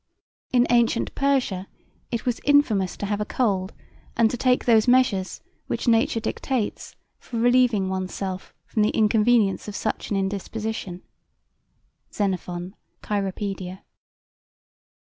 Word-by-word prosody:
J.B.) 255 - +2
in 245 - +5
antient 235 -1 +2
Persia 260 -9 0 0.4
it 235 -2 -3
was 245 -2 -1
infamous 225 -11 +3
to - - -4
have 205 +1 -2
a - - -1
cold 200 -5 0 0.5
and 230 -1 +4
to - - -2
take 250 +1 +2
those 225 -2 +4
measures 245 -7 +2 0.3
which - - -3
nature 225 0 +3
dictates 235 0 -3 0.2
for 235 - -7
relieving 240 -4 +3
oneself 190 0 -4
from 215 - -1
the 210 - +3
inconvenience 215 -1 +3
of 205 - -6
such 215 - -3
an 205 - 0
indisposition. 200 -1 -4 1.1
(Xenophon, 185 -2 -3 0.3
cyropaedia. 195 -2 -3
215 Hz, 125 wpm, -24 LUFS, 195-240 Hz, 1.1 s, in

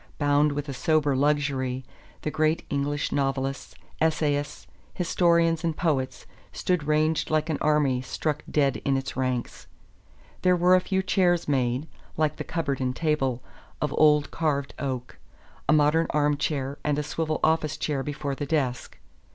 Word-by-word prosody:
Bound 145 0 +3
with 145 +1 -4
a 140 - -4
sober 145 +1 +1
luxury, 135 -2 0 0.4
the 155 - -2
great 155 +1 +1
English 145 +1 -1
novelists, 135 -1 -2 0.3
essayists, 150 -2 0 0.3
historians 170 -2 +2
and 165 -2 -1
poets 130 -6 -1 0.3
stood 180 -5 -1
ranged 155 +1 +1
like 155 +1 +1
an 150 - -2
army 145 -4 +2
struck 150 +3 -2
dead 140 -3 +2
in 135 -1 0
its 135 - -4
ranks. 130 -2 -3 0.7
There 180 0 +4
were 180 +1 +4
a 185 - +5
few 190 0 -1
chairs 180 -3 +2
made, 130 0 0 0.3
like 155 -1 +1
the - - -4
cupboard 145 -6 -2
and 125 0 -1
table, 135 -6 0 0.4
of 150 -1 -1
old 150 -1 +4
carved 145 -4 -1
oak; 130 - -4 0.5
a - - +6
modern 155 +2 +3
arm 150 -1 +2
chair 140 -1 -2
and 150 -1 0
a 150 - 0
swivel 155 +1 -2
office 155 -1 +2
chair 145 -3 -1
before 145 0 -3
the 145 +1 -4
desk. 135 -5 -1
150 Hz, 155 wpm, -26 LUFS, 135-155 Hz, 0.7 s, a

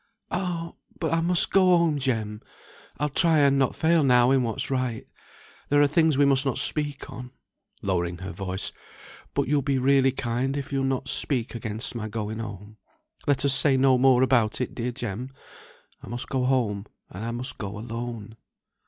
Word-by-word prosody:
"Ah! 170 -3 -3 0.3
but 165 -1 -1
I 165 - +2
must 175 +1 +2
go 185 -2 +5
home, 165 -4 +1
Jem. 110 -5 -2 0.6
I'll 150 - 0
try 160 +3 +3
and 140 -2 +4
not 135 - +1
fail 165 0 +3
now 125 -1 +4
in 135 -1 +3
what's 115 +2 -1
right. 130 -4 -2 0.6
There 145 - +4
are 145 - +6
things 155 0 +2
we 145 - +5
must 135 -1 +4
not 135 -3 -1
speak 145 0 +1
on" 125 0 -8 0.5
(lowering 90 -3 -1
her 95 +2 -7
voice), 95 +2 -3 0.6
"but - - 0
you'll 145 +1 +2
be 135 0 0
really 135 0 +3
kind 130 +2 -2
if 140 0 -5
you'll 135 -1 0
not 135 0 -2
speak 125 -5 0
against 115 +1 -2
my 110 -3 -4
going 110 0 -4
home. 105 -1 -8 0.5
Let 140 -1 +2
us 140 - +4
say 140 -1 +3
no 130 -1 +4
more 130 -1 +5
about 120 -5 +2
it, 125 - -3
dear 125 +1 -3
Jem. 120 0 -5 0.7
I - - -12
must 120 +3 -6
go 130 -2 0
home, 110 -6 0 0.2
and 95 +4 -7
I 115 - -3
must 120 +2 -4
go 105 0 -5
alone." 115 -1 -6
130 Hz, 185 wpm, -25 LUFS, 115-140 Hz, 0.7 s, are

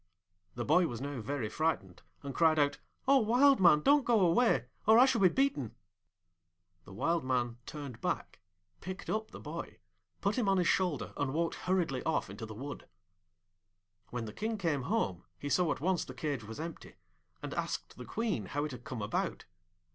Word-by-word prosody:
The 120 -1 -3
boy 170 +3 +4
was 120 -5 -5
now 140 -2 -4
very 130 0 -2
frightened, 110 - -2 0.2
and 140 -1 -5
cried 160 0 +4
out, 145 -1 +2 0.3
'O 275 0 +6
Wild 255 +5 +5
Man, 170 -5 +6
don't 285 - +5
go 235 -2 +3
away, 175 - +3 0.2
or 220 +1 +8
I 250 - +8
shall 260 -5 +2
be 185 - +7
beaten!' 260 - 0 1.1
The - - -12
Wild 165 - 0
Man 120 -2 -1
turned 140 -6 -7
back, - - -3 0.4
picked 185 +2 -6
up 220 0 -2
the - - -10
boy, - - -7 0.4
put 200 +5 0
him 215 -5 +1
on 195 - +3
his 180 -2 +2
shoulder, 180 -6 0
and 145 0 -1
walked 165 0 0
hurriedly 175 -9 0
off 160 -10 -1
into 110 +2 -7
the 110 - -8
wood. 140 +6 -7 1.2
When 120 -2 -4
the 105 - -7
King 220 - -2
came 165 -8 0
home 90 -2 0
he 145 - -5
saw 160 +3 +2
at - - -3
once 180 +2 +1
the - - -9
cage 145 -7 -3
was 110 +5 -8
empty, 165 +1 -7 0.5
and - - -4
asked - - -3
the - - -9
Queen 210 - -2
how 145 +6 -2
it 150 - -5
had 125 -2 -9
come 120 -5 -5
about. 105 - -2
155 Hz, 190 wpm, -32 LUFS, 125-195 Hz, 1.2 s, or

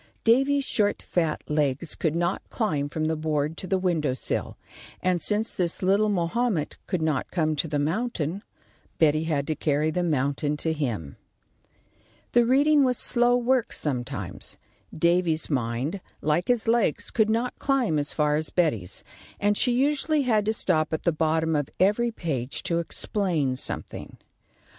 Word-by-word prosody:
Davy's 270 +5 +3
short 205 -5 +1
fat 165 -3 -1
legs 150 +1 0
could 160 -2 -1
not 175 +2 0
climb 150 - -1
from 155 +1 -2
the 160 +1 0
board 155 0 -1
to 185 - -6
the 190 - +1
window 165 -8 0
sill, - - -3 0.4
and 180 -2 0
since 215 +1 +1
this 175 0 -1
little 200 +3 +3
Mahomet 195 -1 0
could 180 -4 -1
not 155 -5 0
come 155 -3 0
to 160 - 0
the 150 -1 -1
mountain, 170 +2 -1 0.6
Betty 155 0 +3
had 145 -4 0
to 155 - -2
carry 150 +1 0
the 180 - -1
mountain 145 -2 0
to 160 +2 +1
him. 115 - -3 1.1
The 240 -1 +4
reading 285 +3 +4
was 250 -2 +1
slow 245 0 +3
work 245 -1 +1
sometimes. 125 -5 -4 0.3
Davy's 170 -1 +1
mind, 130 +7 -1 0.2
like 155 +4 0
his 240 -2 +1
legs, 225 -8 +1
could 220 -2 +2
not 235 +3 -1
climb 250 - +1
as 145 - -2
far 150 -1 +1
as 155 0 -2
Betty's, 115 - -1 0.4
and 205 0 +2
she 245 - +2
usually 290 +4 +1
had 220 -5 +2
to 215 - +2
stop 160 -7 0
at 160 - -2
the 170 - +3
bottom 160 0 +1
of 145 -2 -1
every 210 +6 +3
page 140 - -4
to 170 -1 0
explain 170 -6 -1
something. - - -6
170 Hz, 160 wpm, -26 LUFS, 150-215 Hz, 1.1 s, The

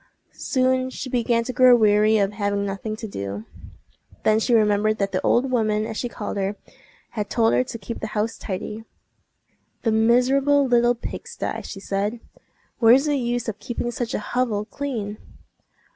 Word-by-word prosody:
Soon 260 -1 0
she 260 0 -7
began 235 -1 +1
to 255 - -5
grow 255 -1 +7
weary 215 -1 +4
of 200 -1 +1
having 200 -1 -1
nothing 200 +2 -4
to 220 0 -7
do. 100 - -5 0.8
Then 215 0 +4
she 235 - -1
remembered 215 0 +2
that 200 -1 -1
the 185 - -1
old 255 +2 +2
woman, 215 -3 +1
as 220 - -5
she 245 - -3
called 210 - -5
her, 195 +1 -1 0.6
had 210 -2 -4
told 225 -1 +2
her - - +3
to 245 - -6
keep 230 +2 -7
the 215 - -4
house 220 +2 0
tidy. 210 +2 -5 1.0
"The 225 - +2
miserable 260 +6 +3
little 240 -1 +3
pig 235 - -7
sty!" - - -4
she 195 - -8
said. 205 +4 -2 0.6
"Where's 245 +5 +6
the 295 -1 +1
use 240 -2 -1
of 215 -2 -4
keeping 240 0 -3
such 240 0 -3
a - - -1
hovel 230 -5 0
clean!" 220 -6 -5
225 Hz, 175 wpm, -23 LUFS, 210-245 Hz, 1.0 s, grow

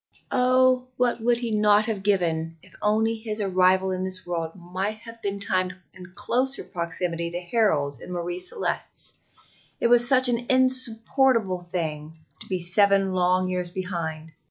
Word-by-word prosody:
Oh, 255 0 +3
what 245 -2 0
would 240 +1 +2
he 235 -1 -3
not 210 0 +3
have 215 -4 -3
given 165 -5 0
if 185 - -19
only 220 +2 +1
his 220 -1 -4
arrival 190 -1 +2
in 185 0 -3
this 185 0 -3
world 165 -2 -4
might 190 +4 -4
have 230 -1 -12
been 200 -1 -3
timed 185 -2 -1 0.2
in 180 -1 -13
closer 255 +6 -1
proximity 170 0 -4
to 175 +1 -4
Harold's 175 - 0
and - - -10
Marie 175 0 -4
Celeste's 185 - -3 0.7
it 235 - +1
was 240 0 +6
such 260 -1 +5
an 240 0 -1
insupportable 255 -6 +3
thing 155 -3 -4 0.2
to - - -11
be 185 -2 -1
seven 195 +2 +3
long 185 0 +2
years 180 -1 -2
behind! 170 -4 -5
190 Hz, 155 wpm, -24 LUFS, 175-230 Hz, 0.7 s, was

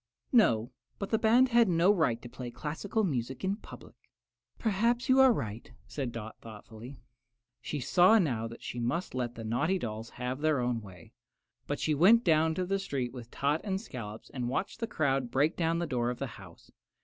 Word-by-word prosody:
"No, 120 - +3 0.3
but 200 - -5
the 220 - +2
band 240 +3 +5
had 235 -3 +4
no 175 +3 +4
right 155 - +1
to - - -7
play 125 0 -7
classical 160 - -3
music 130 - -2
in 195 +2 0
public." - - -13 0.6
"Perhaps 235 +4 +1
you 260 +1 +5
are 265 -1 +8
right," 110 - -4
said 135 -5 -4
Dot, 110 -1 -8
thoughtfully. 115 +3 -11 0.6
She 145 - -4
saw 180 - +5
now 125 - 0
that 115 +1 -11
she 120 - -5
must 145 +10 -2
let 120 -2 -3
the 115 - -7
naughty 125 +12 0
dolls 110 -6 -5
have 125 +3 -5
their 155 -3 +2
own 120 -2 -1
way; 90 -5 -14 0.5
but 145 - -2
she 155 - +1
went 200 +11 +6
down 160 -1 +3
the 185 +2 -1
street 135 -10 -3
with 120 -3 -9
Tot 145 +5 0
and 195 -2 -2
Scollops 115 - -8
and 125 -2 -3
watched 190 - -3
the 230 - -2
crowd 135 - 0
break 145 +6 +1
down 165 -1 0
the 170 - -1
door 125 -5 -1
of 125 - -3
the 135 - -3 0.2
house. 90 -3 -15
140 Hz, 195 wpm, -30 LUFS, 120-190 Hz, 0.6 s, are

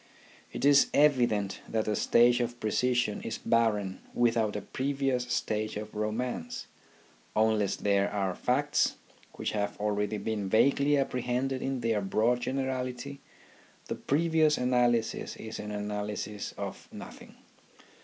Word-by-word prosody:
It - - -3
is 140 -1 +6
evident 120 -9 +3
that 110 -1 -1
a 105 - +1
stage 120 +4 +4
of 120 0 -2
precision 120 0 0
is 115 - -4
barren 105 -5 +1 0.2
without 115 -3 +2
a 105 - -2
previous 135 -2 -1
stage 110 -3 -2
of 105 0 -7
romance: 110 -3 -3 0.7
unless 110 -2 +2
there 100 -1 +1
are 95 -3 -1
facts 140 +8 +1 0.4
which - - -3
have 105 -1 -2
already 105 0 -1
been 105 -1 -3
vaguely 140 +6 +4
apprehended 130 0 -1
in 135 -2 -2
their 115 -3 +1
broad 110 +5 +1
generality, 130 +1 -3 0.7
the - - -4
previous 155 0 +2
analysis 120 -2 +1
is 110 0 -7
an 105 - -5
analysis 105 0 -4
of - - -6
nothing. - - -11
115 Hz, 125 wpm, -29 LUFS, 105-130 Hz, 0.7 s, is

